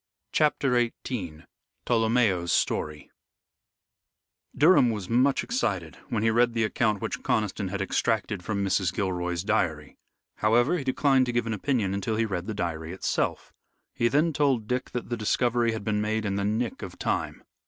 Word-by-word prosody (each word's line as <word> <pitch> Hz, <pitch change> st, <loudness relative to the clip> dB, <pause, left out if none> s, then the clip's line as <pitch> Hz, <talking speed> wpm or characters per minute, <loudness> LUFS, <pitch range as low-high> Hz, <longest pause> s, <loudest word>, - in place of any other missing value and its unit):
CHAPTER 140 Hz, -4 st, +2 dB, 0.3 s
XVIII 90 Hz, -11 st, -5 dB, 0.4 s
TOLOMEO'S 110 Hz, -7 st, +2 dB
STORY 75 Hz, -1 st, -1 dB, 1.5 s
Durham 155 Hz, -5 st, +6 dB
was 105 Hz, -5 st, -3 dB
much 130 Hz, +4 st, +2 dB
excited 95 Hz, -, -2 dB
when 110 Hz, -2 st, -1 dB
he 115 Hz, -, +3 dB
read 120 Hz, +1 st, +2 dB
the 115 Hz, -, +2 dB
account 110 Hz, -2 st, 0 dB
which -, -, -3 dB
Conniston 105 Hz, -5 st, -1 dB
had 100 Hz, +1 st, -2 dB
extracted 105 Hz, 0 st, -1 dB
from 100 Hz, 0 st, -1 dB
Mrs. 95 Hz, -1 st, +1 dB
Gilroy's 90 Hz, -2 st, -2 dB
diary. 80 Hz, -9 st, -1 dB, 0.4 s
However, 120 Hz, +10 st, +3 dB
he -, -, -4 dB
declined 130 Hz, 0 st, +2 dB
to -, -, 0 dB
give 120 Hz, -1 st, 0 dB
an 115 Hz, -, -2 dB
opinion 105 Hz, -3 st, 0 dB
until 100 Hz, +3 st, -2 dB
he 115 Hz, +1 st, +1 dB
read 95 Hz, -4 st, -4 dB
the 110 Hz, -, -3 dB
diary 85 Hz, -3 st, -3 dB
itself. 95 Hz, -, -2 dB, 0.4 s
He 120 Hz, -, +1 dB
then 150 Hz, +6 st, +2 dB
told 135 Hz, -7 st, +1 dB
Dick 125 Hz, +2 st, -2 dB
that 125 Hz, -, -5 dB
the 120 Hz, -, -2 dB
discovery 120 Hz, +2 st, +1 dB
had 110 Hz, -2 st, -4 dB
been 105 Hz, 0 st, 0 dB
made 110 Hz, +1 st, -1 dB
in 100 Hz, -, -1 dB
the 100 Hz, 0 st, -1 dB
nick 110 Hz, +3 st, -1 dB
of -, -, -8 dB
time. -, -, -2 dB
110 Hz, 165 wpm, -27 LUFS, 95-120 Hz, 1.5 s, Durham